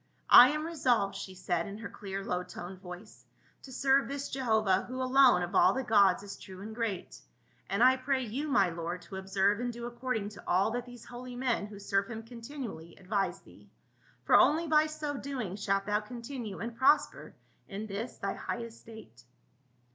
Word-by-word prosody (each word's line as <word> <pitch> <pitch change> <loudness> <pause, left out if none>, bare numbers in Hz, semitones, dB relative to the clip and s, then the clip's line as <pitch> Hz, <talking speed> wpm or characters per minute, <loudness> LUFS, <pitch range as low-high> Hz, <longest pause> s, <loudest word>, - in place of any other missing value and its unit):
" - - -40
I 250 - +8
am 305 +1 -2
resolved," 250 -11 +1
she 190 - -7
said 175 -2 -2
in 200 +1 -7
her 230 - -6
clear 195 -1 -6
low 180 - -1
toned 180 +1 -9
voice, 180 +3 -11 0.4
"to 265 - -12
serve 270 +1 +2
this 280 0 -5
Jehovah, 220 -7 +1
who 255 +1 -6
alone 255 -7 +5
of 175 - -5
all - - +5
the 265 - -2
gods 200 -5 +4
is 200 -1 -9
true 190 -2 -11
and 220 +1 -7
great. 220 -5 -4 0.5
And 200 +4 +2
I 260 +1 +6
pray 260 0 0
you, 255 +7 -4
my 200 - +3
lord, 170 +2 -5
to 190 - -8
observe 195 +2 +1
and 245 0 -2
do 235 0 -7
according 240 -3 -3
to 210 - -13
all 190 +5 +2
that 245 +1 -4
these 245 -2 -12
holy 245 +1 -9
men, 245 -4 -1
who 210 -1 -11
serve 200 0 -1
him 225 -1 -6
continually, 230 - -8
advise 195 +1 -2
thee; - - -18 0.5
for - - 0
only 320 +3 +5
by 310 -1 +4
so 305 -2 -4
doing 255 -10 -4
shalt 195 -1 0
thou 210 0 +1
continue 235 -1 -7
and 230 +3 -5
prosper 270 +5 +2 0.3
in 205 +2 -5
this 215 +3 -5
thy 195 - -2
high 235 - -4
estate." 220 - -12
225 Hz, 195 wpm, -30 LUFS, 195-255 Hz, 0.5 s, I